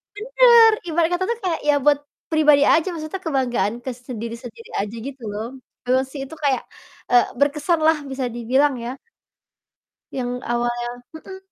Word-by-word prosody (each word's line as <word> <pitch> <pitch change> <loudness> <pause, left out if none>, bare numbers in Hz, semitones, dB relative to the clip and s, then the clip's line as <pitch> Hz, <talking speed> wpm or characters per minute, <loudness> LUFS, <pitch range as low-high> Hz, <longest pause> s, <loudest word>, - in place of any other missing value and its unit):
bener - - -5 0.5
ibaratnya 335 +2 +1
tuh 375 - 0 0.2
kayak 340 -3 0
ya - - +6
buat 290 -1 +4 0.3
pribadi 300 -2 +5
aja, 325 +3 +4
maksudnya 330 +2 -5
kebanggaan 245 - 0
ke 260 - -2
sendiri-sendiri 235 -1 -8
aja 210 +3 -5
gitu 265 -3 -9
loh. 220 +2 -4 0.4
Memang 260 +1 +2
sih, 270 -1 -6
itu 320 - -12
kayak, 270 -2 +1 0.5
eee, 245 -1 +6
berkesan 295 +5 +1
lah 320 -1 +4
bisa 265 -1 -3
dibilang 250 +4 +1
ya. 250 +3 -5 1.2
Yang 245 -1 -2 0.2
awalnya 240 0 -1 0.3
mhm. 380 +4 -9
270 Hz, 145 wpm, -22 LUFS, 240-315 Hz, 1.2 s, ya